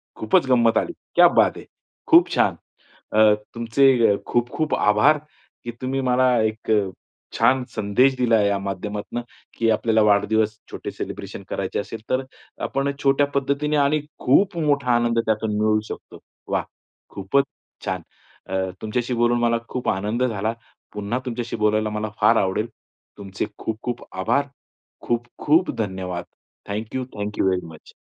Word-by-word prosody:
खूपच 110 +4 +2
गंमत 115 -3 +4
आली. - - 0 0.2
क्या - - +8
बात - - +3
है. - - -10 0.4
खूप - - +6
छान. - - +3 0.6
अ, 110 0 +6 0.2
तुमचे 115 -2 +4
खूप 120 0 +1
खूप 155 -1 -1
आभार, 105 +9 +4 0.4
की 120 - -4
तुम्ही 130 +1 -1
मला 130 0 +3
एक 110 +1 -2
अ, 105 -3 +2 0.4
छान 130 +3 +3
संदेश 110 +6 +3
दिला 115 -3 +3
या 100 -1 +2
माध्यमातनं, 100 +4 -4 0.4
की 115 -1 +2
आपल्याला 110 +1 +2
वाढदिवस 105 +1 +2
छोटे - - -6
सेलिब्रेशन - - -7
करायचे - - -2
असेल, 105 +2 -6
तर 130 - +2
अ, 130 - -15
आपण 140 +1 -1
छोट्या 140 +1 +3
पद्धतीने 140 +2 0
आणि 145 +1 +2 0.2
खूप 175 +7 +3
मोठा 145 -5 +1
आनंद 120 0 +2
त्यातून 110 -1 0
मिळू 110 0 +3
शकतो. - - -9 0.3
वाह! - - 0 0.5
खूपच 100 +9 +1 0.4
छान. - - -2 0.5
अ, 95 0 -1
तुमच्याशी 120 +3 -2
बोलून 120 0 +3
मला 120 0 +2
खूप 125 - -2
आनंद 105 +6 -1
झाला. 110 -2 -1 0.4
पुन्हा 105 +4 -2
तुमच्याशी 120 -1 -4
बोलायला 110 0 +2
मला 105 0 -3
फार 115 - +5
आवडेल. 95 +4 -1 0.5
तुमचे 100 0 -4
खूप 110 - -4
खूप 120 -1 -4
आभार. 120 +9 +1 0.6
खूप 120 0 0 0.2
खूप 160 +5 +4
धन्यवाद. 95 -4 -3 0.5
Thank 105 +3 -4
you, 130 - -1
thank 105 0 -4
you - - +3
very 90 -2 -1
much. 80 -1 -14
115 Hz, 150 wpm, -23 LUFS, 105-130 Hz, 0.6 s, क्या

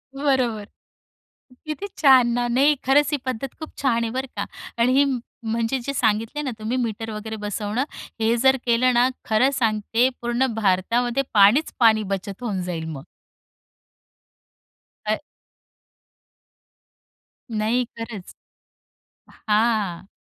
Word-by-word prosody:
बरोबर. 260 -7 0 1.0
किती 310 +7 -4
छान 260 -5 +6
ना! 245 0 0
नाही, 275 +5 +3
खरंच 285 +2 +4
ही 295 - +1
पद्धत 255 0 -4
खूप 315 - -7
छान 235 -4 +1
आहे 225 - -2
बरं 260 +2 -3
का - - -1 0.4
आणि 250 +2 +4
ही 280 - +6
म 265 -3 -1 0.3
म्हणजे 230 +3 0
जे 280 - -2
सांगितले 225 +3 0
ना 275 -3 -3
तुम्ही, 220 +4 -2
मीटर 225 -2 -3
वगैरे 220 +1 -6
बसवणं, 210 +3 -2 0.4
हे 225 +1 +2
जर 265 0 +5
केलं 245 +1 +3
ना 245 +1 +4 0.2
खरं 225 +4 +3
सांगते, 225 0 +1
पूर्ण 240 +2 +1
भारतामध्ये 230 +6 +1
पाणीच 215 +9 +5
पाणी 220 -3 +5
बचत 195 +2 -5
होऊन 200 -6 -2
जाईल 170 -3 -4
मग. 145 -2 -8 2.0
अ. 215 +4 0 2.3
नाही 225 +3 0
खरंच. 225 -5 -8 1.1
हां. 210 -5 +1
235 Hz, 125 wpm, -23 LUFS, 215-260 Hz, 2.3 s, छान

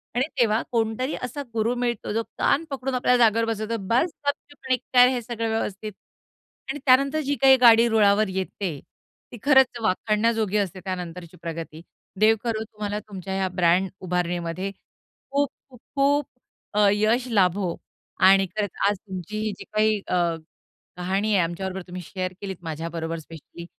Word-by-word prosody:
आणि 250 +2 +2
तेव्हा 225 -1 +3
कोणतरी 230 +4 0
असा 250 +4 -4
गुरू 230 +2 0
मिळतो 240 -4 -2
जो 225 +1 0
कान 300 - +2
पकडून 265 -1 -3
आपल्या 250 0 +3
जागेवर 230 -1 +4
बसवतो. 225 0 -2
"बस 255 +9 +2 0.2
गपचुप 285 -1 -4
आणि 255 - +3 0.2
कर 250 0 +8
हे 250 -2 0
सगळं 230 -1 -3
व्यवस्थित." 215 -1 -3 0.8
आणि 295 - -3
त्यानंतर 275 +4 +4
जी 285 +1 0
काही 265 -1 +8
गाडी 230 0 +7
रुळावर 215 -1 +4
येते, 190 -4 -4 0.5
ती 240 - -8
खरंच 265 -4 +4
वाखाडण्याजोगी 215 0 +1
असते, 190 -2 -2
त्यानंतरची 180 -1 -6
प्रगती. 165 -1 -6 0.4
देव 220 +1 +5
करो 225 -2 -1
तुम्हाला 210 -1 -5
तुमच्या 190 -2 -7
या 190 -1 0
ब्रँड 180 +1 +2
उभारणीमध्ये, 180 +1 -2 0.6
खूप-खूप, 275 -2 -3 0.2
खूप, 285 +1 +3 0.5
अ, 210 -1 +4
यश 220 +5 +1
लाभो. 185 -3 +2 0.4
आणि 195 +1 +6
खरंच 210 -2 -1 0.2
आज 205 - -1
तुमची 190 +3 -6
ही 215 0 -1
जी - - -7
काही 215 0 +3
अ, - - 0 0.8
कहाणी 195 +4 0
आहे 185 - +4
आमच्याबरोबर 190 +3 -4
तुम्ही 180 +1 -7
शेअर 185 0 -4
केलीत, 195 -3 -5
माझ्याबरोबर 165 +1 -4
स्पेशली. 165 +2 -11
215 Hz, 150 wpm, -24 LUFS, 185-240 Hz, 0.8 s, कर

